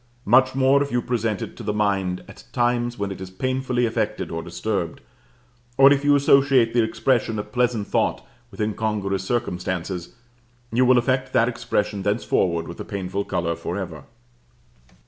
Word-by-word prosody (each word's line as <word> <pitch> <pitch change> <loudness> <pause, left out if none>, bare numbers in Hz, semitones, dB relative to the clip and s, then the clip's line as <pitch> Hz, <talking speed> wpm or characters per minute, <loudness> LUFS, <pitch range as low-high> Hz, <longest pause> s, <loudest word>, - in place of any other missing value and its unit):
Much 130 +4 +4
more 135 +1 +4
if 140 - -2
you 120 - +1
present 115 -5 -1
it - - -8
to - - -10
the 105 -2 -2
mind 95 -3 0
at - - -13
times 120 0 0
when 100 -1 -3
it 95 - -7
is 95 - -6
painfully 130 +4 -1
affected 110 -2 -2
or 80 0 -3
disturbed, 85 0 -3 0.8
or 135 +1 +8
if 140 0 -1
you 145 0 +5
associate 135 -4 +4
the 120 - +4
expression 115 0 0
of 105 0 -5
pleasant 120 -3 +1
thought - - 0 0.2
with - - -15
incongruous 105 -2 -1
circumstances, 90 -4 -3 0.6
you 125 +2 +4
will 125 0 +5
affect 130 +1 0
that 115 - +4
expression 105 -4 -2
thenceforward 95 -4 0
with - - -9
a - - -4
painful 100 0 -3
color 85 -3 -2
for 85 +3 -4
ever. 85 -7 -6
110 Hz, 165 wpm, -23 LUFS, 95-125 Hz, 0.8 s, or